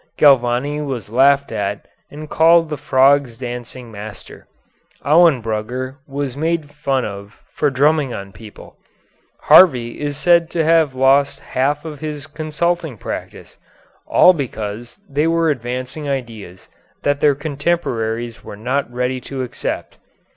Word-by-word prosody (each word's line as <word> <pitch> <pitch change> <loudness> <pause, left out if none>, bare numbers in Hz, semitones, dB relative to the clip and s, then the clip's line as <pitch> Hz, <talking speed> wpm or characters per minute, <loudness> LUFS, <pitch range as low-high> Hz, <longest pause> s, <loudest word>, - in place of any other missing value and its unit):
Galvani 135 +1 +3
was 125 -8 -5
laughed 140 +3 +3
at 100 -2 -3 0.2
and 155 +1 -9
called 165 +1 +4
the - - -1
frogs' 135 -3 +2
dancing 120 0 -7
master; 105 -1 -10 0.6
Auenbrugger 130 -5 +2
was 140 -2 -4
made 160 0 -2
fun 140 -3 -1
of 100 0 -9
for 145 - +1
drumming 145 +1 +2
on 100 -3 -7
people; 105 +1 -14 0.6
Harvey 125 -10 +5
is 145 -1 -3
said 170 +1 +3
to 165 -2 0
have 160 -4 +3
lost 135 +2 +3
half 145 +4 -1
of 150 -3 -7
his 150 -2 -5
consulting 155 -1 -2
practice; - - -8 0.5
all 185 - +6
because 120 - -6
they 145 +3 0
were 165 -1 +2
advancing 130 +3 -5
ideas 115 -9 -6 0.4
that 145 0 +1
their 145 -2 +3
contemporaries 130 -7 -2
were 105 - -9
not 125 +3 -2
ready 125 +1 -2
to 135 0 -5
accept. 125 - -5
135 Hz, 130 wpm, -19 LUFS, 120-150 Hz, 0.6 s, all